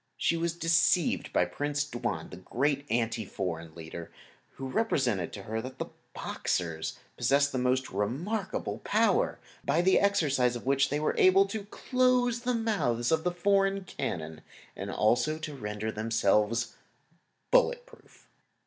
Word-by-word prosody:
She 170 - +1
was 165 0 -1
deceived 165 0 +2
by - - +3
Prince 145 +10 -2
Tuan, 120 -5 -4
the - - -8
great 140 +2 -1
anti 115 -1 0
foreign 85 -5 -5
leader, 85 0 -8 0.4
who 135 - -6
represented 130 - 0
to - - -7
her 110 0 -3
that 130 +2 -8
the - - -5 0.2
Boxers 85 -3 -2 0.2
possessed 140 +1 +3
a 130 - 0
most 130 +1 +1
remarkable 145 - -2
power, - - +2 0.3
by 170 - +2
the 190 +1 +5
exercise 145 -11 +2
of 120 - -7
which 135 +1 +3
they 145 - 0
were 155 - +1
able 190 +1 +6
to 200 +1 -5
close 250 +1 +1
the 250 +1 -1
mouths 180 - 0
of 160 0 +2
the 180 - +2
foreign 195 +2 +2
cannon 80 - -5 0.3
and - - -5
also 125 +8 +2
to 155 -1 -6
render 105 -3 -4
themselves 110 +1 +1 0.8
bulletproof. - - 0
140 Hz, 145 wpm, -29 LUFS, 110-190 Hz, 0.8 s, able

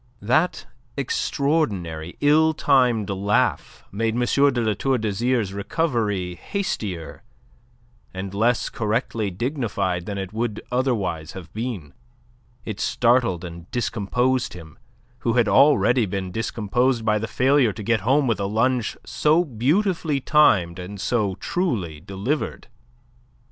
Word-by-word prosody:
That 155 - +1 0.3
extraordinary, 110 - -1
ill 155 +2 +4
timed 125 -8 +3
laugh 100 +2 0
made 110 +2 -1
M. 125 - 0
de 140 -1 +3
La 110 -1 +1
Tour 130 +6 0
d'Azyr's 110 -1 0
recovery 105 - -1
hastier 95 - -4 0.9
and 95 +1 -6
less 115 +4 +1
correctly 110 -1 -1
dignified 100 - -2
than 100 -1 -4
it 95 0 -5
would 110 -1 -2
otherwise 100 - -1
have 90 -4 -10
been. 110 - -5 0.7
It 105 -2 -5
startled 115 -8 +2
and 85 0 -10
discomposed 125 +2 0
him, 80 -3 -12 0.4
who 115 -2 0
had 120 -2 +3
already 125 -3 +4
been 95 -1 -4
discomposed 115 +3 0
by 105 -1 +2
the 110 - -3
failure 130 -2 +3
to 105 - -8
get 115 +1 +2
home 135 +8 +2
with 115 -4 0
a 100 - -1
lunge 115 +3 0
so 160 +4 +2
beautifully 155 - 0
timed 100 - +3
and 95 +3 -7
so 105 -3 0
truly 105 - -2
delivered. 100 - -3
115 Hz, 125 wpm, -23 LUFS, 95-130 Hz, 0.9 s, ill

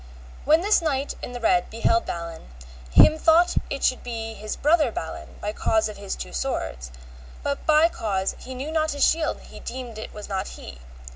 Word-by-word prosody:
When 310 +4 +5
this 415 +1 +3
knight 285 -3 -1
in 245 - -6
the 245 - -5
red 180 -6 +2
beheld 345 +10 +1
Balin, 170 - -6 0.4
him 310 - +6
thought 335 +2 +4
it 275 - -4
should 255 - +2
be 225 -2 -5
his 215 0 -5
brother 300 -4 +3
Balin 160 -6 -6
by 210 +1 -3
cause 220 0 +1
of 215 - -8
his 65 - -4
two - - -7
swords, 60 0 -3 0.5
but 280 0 -2
by 310 +1 +6
cause 195 - -2
he 260 - -8
knew 275 +5 -4
not 315 -1 +1
his 285 - +3
shield 320 -1 +1
he - - -12
deemed 240 -3 -7
it 220 - -7
was 210 - -9
not 195 0 -2
he. 65 -2 -10
245 Hz, 195 wpm, -24 LUFS, 200-310 Hz, 0.5 s, him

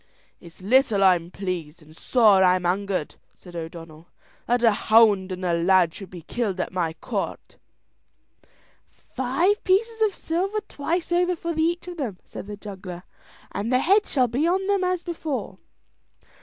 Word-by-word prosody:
"It's 170 +2 -15
little 220 -2 +3
I'm 175 -3 +3
pleased, 175 -5 -5
and 155 +1 -18
sore 210 -2 +4
I'm 180 -1 +3
angered," 185 -2 -1 0.2
said 180 -2 -14
O'Donnell, 165 -1 -9 0.4
"that 245 0 +1
a 230 - +6
hound 210 -3 +4
and 185 0 -4
a 175 - +1
lad 170 0 +3
should 195 - -10
be 175 -3 -10
killed 200 0 -3
at - - -3
my 170 -3 -1
court." - - -5 1.6
"Five 335 - +1
pieces 445 +4 +1
of 425 -3 +2
silver 385 +6 -2
twice 335 +5 -3
over 355 +1 +2
for 335 0 -4
each 340 +3 0
of 355 -1 -7
them," 235 - -4
said - - -9
the 205 0 -7
juggler, 190 -4 -8 0.5
"and 205 +5 -3
their 255 - +4
heads 395 +9 +2
shall 255 -3 +3
be 265 +8 0
on 380 +2 +1
them 400 -1 +1
as 365 -1 -1
before." 280 - -5
210 Hz, 160 wpm, -24 LUFS, -, 1.6 s, a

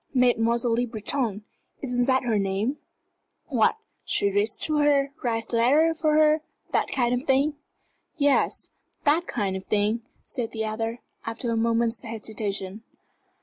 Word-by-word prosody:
Mademoiselle 235 -1 +3
Le 245 +2 +1
Breton 220 -1 -2 0.4
isn't 245 -2 +1
that 260 0 +2
her 225 -4 +1
name? 200 +8 -1 0.7
What 240 - +3 0.3
she 200 - +1
reads 205 +2 +1
to 305 -1 +1
her, 290 -1 +5
and 275 - -6
writes 225 -1 -2
letters 305 +8 +3
for 305 -2 +3
her 310 0 +4 0.3
that - - +1
kind 245 -2 +1
of 250 +4 -2
thing?" 275 +3 +3 0.6
"Yes 285 -2 +2 0.3
that 315 +4 +2
kind 200 -6 -1
of 190 - -6
thing," 210 +2 +1 0.2
said 240 -5 -5
the 220 -1 -2
other, 225 +2 -3 0.3
after 230 +1 -3
a - - +1
moment's 230 0 +1
hesitation. 215 -3 -4
235 Hz, 145 wpm, -26 LUFS, 220-270 Hz, 0.7 s, her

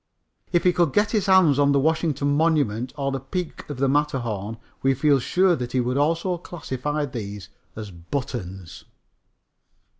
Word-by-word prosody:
If 175 -2 +2
he 180 - +4
could 170 -6 +2
get 205 0 +2
his 210 -4 0
hands 180 -7 +5
on 140 0 +4
the 140 - +3
Washington 145 -2 +1
Monument 145 -7 +1
or 140 -1 -1
the 135 - -2
peak 165 +7 -5
of 145 - -5
the 135 +1 +1
Matterhorn, 120 -7 -1 0.2
we 135 0 +2
feel 140 +1 +3
sure 180 +7 +2
that 125 -3 -5
he 130 - +2
would 125 +1 0
also 165 +5 +1
classify 150 -3 -3
these 105 -6 -7 0.3
as 105 -2 -7
buttons. 95 -1 -6
140 Hz, 160 wpm, -24 LUFS, 125-160 Hz, 0.3 s, hands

